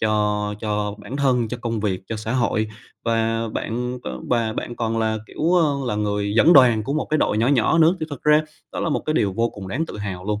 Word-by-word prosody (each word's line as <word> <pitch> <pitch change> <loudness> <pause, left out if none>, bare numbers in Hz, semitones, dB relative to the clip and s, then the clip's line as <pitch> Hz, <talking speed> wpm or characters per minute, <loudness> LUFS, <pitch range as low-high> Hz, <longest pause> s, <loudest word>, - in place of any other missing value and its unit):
cho 105 -1 0
cho 105 -2 -2
bản 105 +6 -7
thân, 125 -5 +2
cho 125 - -4
công 115 -2 -2
việc, 95 -3 -1
cho 115 - -4
xã 110 +1 -4
hội, 110 -3 +1 0.4
và 115 0 0
bạn 125 +3 -3
v - - -12 0.2
và 115 -2 +1
bạn 120 +2 -5
còn 115 -1 -1
là, 110 -1 0
kiểu, 160 +9 -1
ờ, 155 -5 +3
là 105 - -1
người 105 -1 -1
dẫn 165 - +6
đoàn 125 -7 +6
của 135 - -3
một 155 - -1
cái 155 - +2
đội 105 - +1
nhỏ 115 - +2
nhỏ 140 +3 +3
nữa, 165 +3 +5
thì 155 - -2
thật 145 - -7
ra 150 0 +5 0.3
đó - - -3
là - - 0
một 150 - 0
cái 155 - 0
điều 100 -9 +1
vô 115 +4 +1
cùng 95 -2 -9
đáng 150 +11 -2
tự - - -8
hào 95 -3 -5
luôn. 105 0 -2
115 Hz, 255 wpm, -22 LUFS, 105-130 Hz, 0.4 s, dẫn